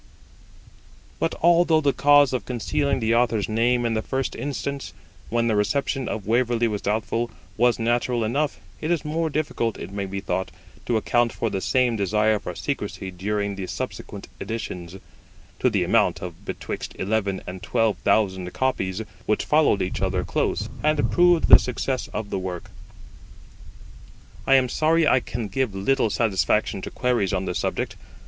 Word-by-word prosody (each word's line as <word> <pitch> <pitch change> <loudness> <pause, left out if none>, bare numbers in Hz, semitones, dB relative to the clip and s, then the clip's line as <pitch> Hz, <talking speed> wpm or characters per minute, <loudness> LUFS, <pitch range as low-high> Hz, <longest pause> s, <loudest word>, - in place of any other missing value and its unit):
But - - 0
although 170 -1 +5
the 145 -3 +2
cause 145 -2 +5
of 130 - -1
concealing 130 +3 -1
the 110 +1 +2
Author's 115 -3 +2
name 120 +2 +2
in 115 - +1
the 110 - 0
first 135 +3 -2
instance, 140 0 -4 0.4
when 115 0 +1
the 115 -2 +2
reception 130 +5 0
of 110 -3 -4
Waverley 120 +1 +2
was 105 -2 -3
doubtful, 110 +3 -1 0.3
was 120 +2 +3
natural 120 +1 0
enough, 140 +7 -1 0.2
it 155 - -2
is 170 -3 0
more 160 +2 -1
difficult, 145 -7 -1
it 85 - -7
may 100 -1 -3
be 100 +1 -4
thought, 95 -1 -2 0.4
to 120 - +2
account 120 +2 +2
for 115 - -2
the 95 -1 -2
same 125 0 +2
desire 105 +2 +2
for 100 - -6
secrecy 105 -8 -4
during 100 +2 -2
the 95 -1 -5
subsequent - - -6
editions, 90 -6 -5 0.6
to - - +3
the - - +1
amount - - +2
of 85 -2 -8
betwixt - - -5
eleven 100 -1 -1
and 90 0 -7
twelve 115 -3 +1
thousand 95 -4 +1
copies, 110 -6 -1 0.2
which 105 - +1
followed 150 -10 +3
each 90 - -3
other 95 -1 0
close, - - -1
and 150 0 +1
proved 175 -1 +4
the - - +10
success 130 +1 -2
of 105 -1 -5
the - - -1
work. 90 -2 -6 1.8
I 135 - +6
am 130 -1 +4
sorry 155 +5 +2
I - - +5
can 115 -2 -5
give 110 0 -1
little 115 +5 +1
satisfaction 105 -2 +1
to - - -5
queries 120 -6 0
on 95 0 0
this 90 - -2
subject. - - -2
115 Hz, 165 wpm, -24 LUFS, 100-130 Hz, 1.8 s, the